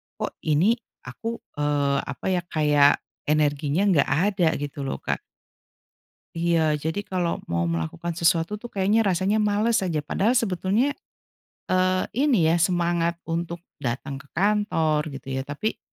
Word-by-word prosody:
"Kok - - -5
ini 185 +11 +3 0.2
aku, 230 0 -5 0.2
eee, 145 -1 +1
apa - - -8
ya, 180 - +1
kayak 150 -3 +3 0.2
energinya 150 +3 +1
nggak 145 -6 +3 0.2
ada," 170 -4 +2
gitu 145 -1 -5
loh, - - -5
Kak. - - -1 1.2
Iya, 165 -2 +2
jadi 160 +7 -3
kalau 180 -3 -1
mau 85 0 -1
melakukan 85 - -3
sesuatu 170 +4 +2
tuh 240 - -13
kayaknya 205 +3 +2
rasanya 195 +3 +2
males 215 +2 +2
aja, 155 -4 -1
padahal 210 - +1
sebetulnya, 220 +2 +1 0.8
eee, 185 0 +2
ini 255 - +3
ya 165 +2 +3
semangat 170 -1 +1
untuk 170 +1 -4 0.2
datang 135 +2 -3
ke 145 - -15
kantor 195 -6 +2
gitu 135 0 -7
ya 135 - -1
tapi 145 +10 -3
170 Hz, 140 wpm, -25 LUFS, 150-200 Hz, 1.2 s, ini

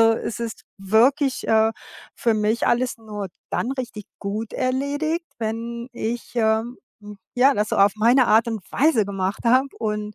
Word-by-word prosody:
also, 225 0 +6
es 225 - -4
ist 230 -1 -5
wirklich, 245 +8 +2
äh, 220 0 +4 0.4
für 230 -2 +1
mich 215 +2 +1
alles 250 +1 +1
nur 210 -3 -6 0.2
dann 250 - -1
richtig 240 -6 -6 0.2
gut 210 +2 -4
erledigt, 290 +6 -1
wenn 235 +2 -4
ich, 235 +1 -4
ähm, 225 +2 +1 0.2
hm, 205 -1 -11 0.2
ja, 265 +3 +5
das 210 +1 -1
so - - 0
auf 200 0 +5
meine 240 +4 +4
Art 220 +2 +5
und 220 -4 -4
Weise 275 -5 +3
gemacht 195 0 -3
habe 255 +4 +4
und 210 -1 -3
225 Hz, 165 wpm, -23 LUFS, 215-250 Hz, 0.4 s, also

